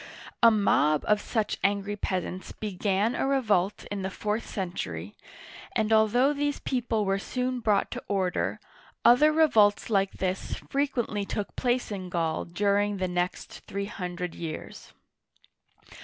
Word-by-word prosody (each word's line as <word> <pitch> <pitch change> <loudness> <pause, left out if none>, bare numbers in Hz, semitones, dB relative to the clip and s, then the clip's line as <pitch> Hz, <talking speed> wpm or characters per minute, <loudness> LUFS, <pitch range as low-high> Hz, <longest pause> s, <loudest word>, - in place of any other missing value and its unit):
A 230 - +9
mob 155 -8 +3
of 210 -1 +3
such 220 -3 -1
angry 200 +1 +1
peasants 185 -2 -3
began 205 +2 0
a - - 0
revolt 210 -8 +1
in 200 -1 -3
the 190 - -2
fourth 210 +3 -3
century, 105 - -4 0.6
and 220 0 +2
although 235 +6 +4
these 290 0 -1
people 235 -4 -1
were 195 0 +1
soon 250 +4 -2
brought 210 -4 +1
to - - -5
order, 190 -3 0 0.5
other 295 +6 +7
revolts 225 -10 +4
like 195 -2 +2
this 185 0 -2
frequently 260 -7 -1
took 200 +1 -4
place 245 -2 0
in 185 -3 -5
Gaul 165 -2 -1
during 200 +3 +1
the 185 -1 -1
next 180 0 -3
three 200 0 -3
hundred 180 -3 -5
years. 160 -2 -7
205 Hz, 140 wpm, -27 LUFS, 185-230 Hz, 0.6 s, A